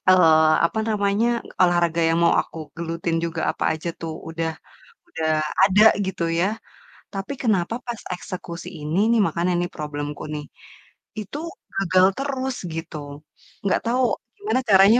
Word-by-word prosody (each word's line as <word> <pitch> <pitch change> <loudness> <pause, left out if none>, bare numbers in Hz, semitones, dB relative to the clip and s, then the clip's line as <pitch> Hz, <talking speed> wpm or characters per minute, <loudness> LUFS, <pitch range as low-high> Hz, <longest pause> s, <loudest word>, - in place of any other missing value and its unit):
eee, 160 -3 +6 0.2
apa 220 - -5
namanya, 205 +1 +1 0.4
olahraga 175 -2 +3
yang 165 +1 +2
mau - - +5
aku 165 - -11 0.2
gelutin 165 0 -2
juga 165 -1 -3
apa - - -4
aja 165 +2 -5
tuh 165 -1 -4 0.2
udah 165 0 -2 0.6
udah 160 -1 -2 0.4
ada 205 +2 +5 0.2
gitu 190 -3 -3 0.2
ya. 180 - +3 0.7
Tapi 195 +8 -4
kenapa 210 -2 +1
pas 240 -1 -4 0.2
eksekusi 180 -1 -7
ini 155 +5 -1
nih 235 - +4
makanya 175 +2 0
ini 175 - +1
problemku 145 -1 -5
nih, 150 -1 -4 0.7
itu 215 +8 -6 0.4
gagal 185 -1 +4
terus 265 -2 -2 0.2
gitu? 165 -1 -5 0.7
Nggak 195 - +2
tahu 255 +2 +2 0.3
gimana 410 -9 0
caranya 200 +5 +7
175 Hz, 140 wpm, -23 LUFS, 165-205 Hz, 0.7 s, caranya